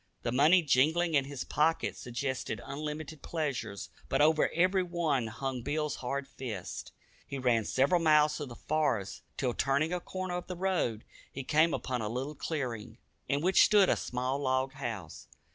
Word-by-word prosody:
The 120 - -1
money 155 +8 +5
jingling 160 +5 +3
in 140 -2 +3
his 140 -2 -5
pocket 160 +2 +1
suggested 130 +2 -3
unlimited 150 +1 -5
pleasures, 140 -11 -3 0.2
but - - +1
over 155 +1 +4
every 185 +3 +2
one 165 -9 0
hung 130 +3 -4
Bill's 150 +3 -2
hard 135 +2 -3
fist. 120 -9 -6 0.4
He 140 - -4
ran 120 -4 +2
several 140 - +2
miles 150 -1 +5
through 145 - -4
the 120 - -9
forest, 145 -11 -1 0.2
till, 125 -3 0
turning 140 +7 +1
a 180 - 0
corner 185 0 -4
of 180 - -7
the 180 - -5
road, 175 - 0 0.3
he 135 - -5
came 155 +4 +3
upon 125 -4 -2
a 105 - -2
little 130 +6 -3
clearing, 120 -8 -4 0.3
in 140 +1 0
which 185 +3 +5
stood 205 -3 +5
a - - +4
small 125 +2 -2
log 130 -1 0
house. 115 - -6
140 Hz, 170 wpm, -31 LUFS, 125-160 Hz, 0.4 s, money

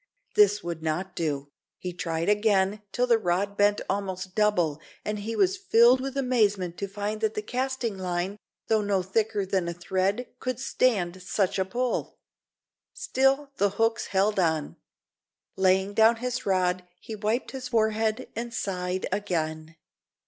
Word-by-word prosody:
This 205 0 +4
would 170 -2 -4
not 160 +4 -2
do. 145 -4 -2 0.3
He 180 -1 -5
tried 165 -1 -2
again 205 -1 +2
till 250 - +1
the 235 -2 +4
rod 200 +1 0
bent 205 0 +3
almost 190 -1 -3
double, 180 -8 +1 0.2
and 210 0 -2
he 225 +2 -4
was 385 0 +2
filled 250 - +5
with 270 +1 -4
amazement 210 -9 +1
to 200 - -2
find 205 +2 -4
that 220 -1 0
the 210 - -2
casting 250 -3 -2
line, 185 +2 -2 0.3
though 220 -1 +2
no 200 -2 +1
thicker 210 +1 0
than 190 -2 0
a 170 - -3
thread, 190 +6 0
could 255 -2 -3
stand 195 -9 +1
such 195 +1 0
a 190 - +2
pull. 245 +5 -2 0.8
Still 275 - +1
the 200 - +3
hooks 225 0 +1
held 200 +1 +1
on. 160 -4 0 0.8
Laying 190 +1 +2
down 225 +2 +5
his 250 0 -3
rod, 185 -1 +1 0.2
he 225 - -8
wiped 215 +4 -1
his 260 -2 -5
forehead 220 -2 +1
and 235 +1 -4
sighed 185 -2 -2
again. 160 -5 -2
205 Hz, 155 wpm, -27 LUFS, 185-225 Hz, 0.8 s, filled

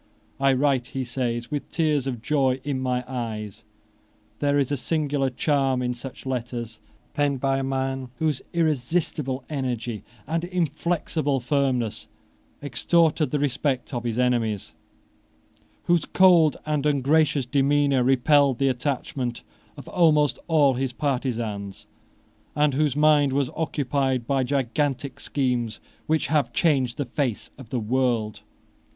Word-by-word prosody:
"I 135 0 +4
write," 130 -2 +1
he 130 - -1
says, 120 -1 -3
"with 145 -1 -3
tears 150 -5 0
of 120 -4 -4
joy 135 -2 +1
in 140 -2 -2
my 125 -1 -1
eyes." 110 -5 -5 0.8
There 145 0 +2
is 140 -1 +1
a - - +2
singular 145 -1 0
charm 135 -1 +1
in 125 0 -1
such 125 +2 -9
letters, 120 -3 -4 0.3
penned 145 -2 0
by 135 +1 +1
a - - -2
man 135 -1 -2
whose 155 -4 0
irresistible 150 -3 0
energy 120 -6 -3 0.2
and 165 +1 -2
inflexible 165 -4 -1
firmness 125 -3 -1 0.6
extorted 155 +4 +2
the 150 - 0
respect 140 -1 -1
of 120 -1 -2
his 115 -1 -2
enemies, 120 -5 0 1.1
whose 170 -3 +2
cold 175 -5 +5
and 150 -1 0
ungracious 145 0 +2
demeanour 140 0 +2
repelled 135 +1 +4
the 135 +1 +2
attachment 125 -1 -3 0.3
of - - -10
almost 150 -7 +3
all 150 -5 +4
his 130 0 -2
partisans, 115 -8 -3 0.7
and 150 -1 +2
whose 145 -1 +1
mind 150 -2 +4
was 140 -2 0
occupied 135 -5 -1
by 135 +1 +1
gigantic 135 +1 -1
schemes 125 -6 -1 0.3
which 155 -1 +1
have 145 -5 +1
changed 130 -6 +1
the 145 - -1
face 125 -2 -3
of 125 -5 -11
the 125 - -1
world. 115 -2 0
135 Hz, 135 wpm, -24 LUFS, 125-145 Hz, 1.1 s, cold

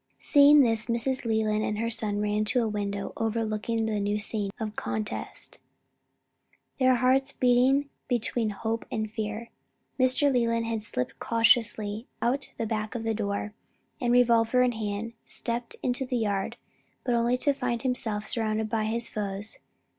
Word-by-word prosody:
Seeing 290 +1 +6
this, 225 -3 +1
Mrs. 245 +2 -1
Leland 215 -1 +1
and 210 - -1
her 230 +1 -1
son 215 -3 0
ran 210 0 +1
to 250 +2 +2
a - - 0
window 205 -1 -3
overlooking 225 0 -1
the 215 -1 -1
new 205 +1 0
scene 210 -1 -1
of 215 -1 -4
contest, 215 -1 -5 1.2
their 255 -1 +5
hearts 260 +2 +2
beating 255 +3 +3 0.2
between 235 -2 0
hope 220 +3 -3
and 220 -1 -2
fear. 220 +1 -4 0.5
Mr. 255 +2 +3
Leland 230 -2 +1
had 225 -1 -2
slipped 125 - -2
cautiously 225 -1 +2
out 270 +4 0
of - - -31
the 230 - -1
back 215 -1 -2 0.2
door, 205 0 -2 0.5
and, 240 -1 +1
revolver 240 0 +4
in 250 - +3
hand, 220 0 -4
stepped 235 0 -2
into 250 +1 0
the 255 -1 -2
yard, 200 -4 -1 0.5
but 245 - 0
only 235 +1 +2
to 285 +3 +2
find 250 -3 -2
himself 225 -5 -1
surrounded 220 -2 -1
by 220 -1 0
his 230 +2 -2
foes. 205 0 -1
225 Hz, 155 wpm, -27 LUFS, 215-245 Hz, 1.2 s, Seeing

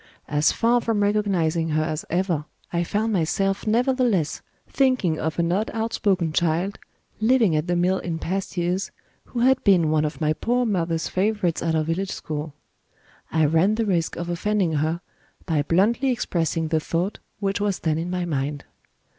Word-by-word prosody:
As 150 +1 +2
far 240 +1 +2
from 220 -3 0
recognizing 180 -6 +1
her 155 0 +1
as 155 -1 -3
ever, 175 -4 0 0.3
I 170 0 +1
found 215 +5 -1
myself 195 +4 0
nevertheless 240 - +1 0.3
thinking 255 - +1
of 160 0 -2
an 170 0 +1
odd 205 +5 0
outspoken 200 -7 0
child, 170 +5 0 0.4
living 220 -6 +3
at 155 +2 0
the 175 - +1
mill 180 +2 +2
in 165 -2 -3
past 190 +3 -3
years, 180 +2 0 0.4
who 240 - -4
had 260 +1 +3
been 175 -6 +4
one 155 -1 +2
of 150 +1 -3
my 155 -1 +2
poor 245 +8 0
mother's 165 -6 0
favorites 190 -3 0
at 165 -1 0
our 155 - +2
village 170 +5 -2
school. 150 -1 -5 0.8
I 160 -1 +3
ran 165 +8 +3
the 225 0 0
risk 175 -5 0
of 170 - -4
offending 180 +1 0
her, 155 +3 0 0.4
by 160 -5 +1
bluntly 210 - +2
expressing 165 -9 -1
the 160 -1 +2
thought 170 +6 -2 0.2
which 200 0 -1
was 205 -2 0
then 160 -1 -1
in 170 +2 -3
my 180 -1 -2
mind. 145 -2 -3
175 Hz, 170 wpm, -24 LUFS, 160-205 Hz, 0.8 s, been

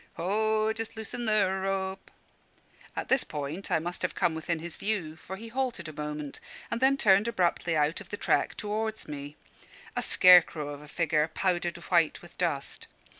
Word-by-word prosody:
"Ho! 215 +4 +1
just 225 0 -5
loosen 235 +2 -4
the 215 -3 +4 0.2
rope" 195 0 -2 0.9
At - - -3
this 265 -1 +3
point 150 +6 -5
I - - +3
must 175 +2 -4
have 180 - -1
come 170 - +2
within 160 +1 -2
his 165 +1 -6
view, 190 -7 -2
for 180 +4 -8
he 225 +3 -9
halted 245 -8 -2
a 155 - -7
moment, 150 -1 -5 0.3
and 235 +1 -2
then 270 +1 +5
turned 200 -2 +4
abruptly 175 -6 +1
out 150 +5 +1
of 190 - -12
the 205 - -4
track - - +1
towards 215 +1 -3
me, 145 0 -7 0.6
a - - 0
scare 180 -1 +8
crow 150 -3 -6
of 145 0 -7
a 150 - -12
figure, 155 -1 +1
powdered 175 +1 -1
white 170 -3 +1
with 175 - -14
dust. 165 -6 -2
180 Hz, 180 wpm, -29 LUFS, 155-215 Hz, 0.9 s, scare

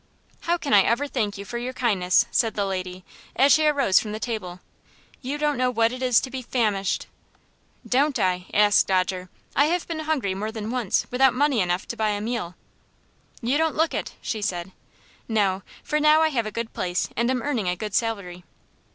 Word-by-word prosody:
"How 345 +1 0
can 290 -7 -2
I 205 - +8
ever 235 +8 +1
thank 215 -8 -2
you 200 - -7
for 235 +3 -5
your 250 +2 -4
kindness?" 205 -5 +2
said 225 -3 +1
the 200 - 0
lady, 185 -1 -5 0.3
as 275 +2 +5
she 310 0 +5
arose 275 -10 +4
from 210 -1 -5
the 215 - -4
table. 205 -7 -4 0.6
"You 275 +3 -3
don't 295 -2 0
know 255 0 +2
what 230 -1 +2
it 255 +1 -7
is 250 -3 +4
to 260 - -6
be 260 0 -4
famished 215 -6 0 0.4
" - - -24
"Don't 285 0 +2
I?" 180 -1 0
asked 205 0 +4
Dodger. 185 -1 0 0.3
"I 285 - +5
have 345 +3 -1
been 330 -2 -4
hungry 300 -11 -1
more 210 +3 -4
than 220 0 -5
once, 245 -6 0
without 255 0 +4
money 280 -2 +2
enough 180 +1 -1
to - - -3
buy 220 -2 0
a 205 -1 -1
meal." 215 -5 -3 0.9
"You 260 +6 +1
don't 320 -1 +1
look 320 +1 +1
it," - - -4
she 220 - -3
said. 185 -3 -3 0.6
"No, 200 -4 +1 0.2
for 300 - 0
now 305 +1 +5
I 320 - +4
have 235 -7 -1
a - - -5
good 230 0 -5
place 175 -1 -1
and 235 +2 +1
am 255 -2 0
earning 240 -10 -1
a 180 - 0
good 210 +2 -6
salary." 200 -6 -2
225 Hz, 210 wpm, -24 LUFS, 195-265 Hz, 0.9 s, I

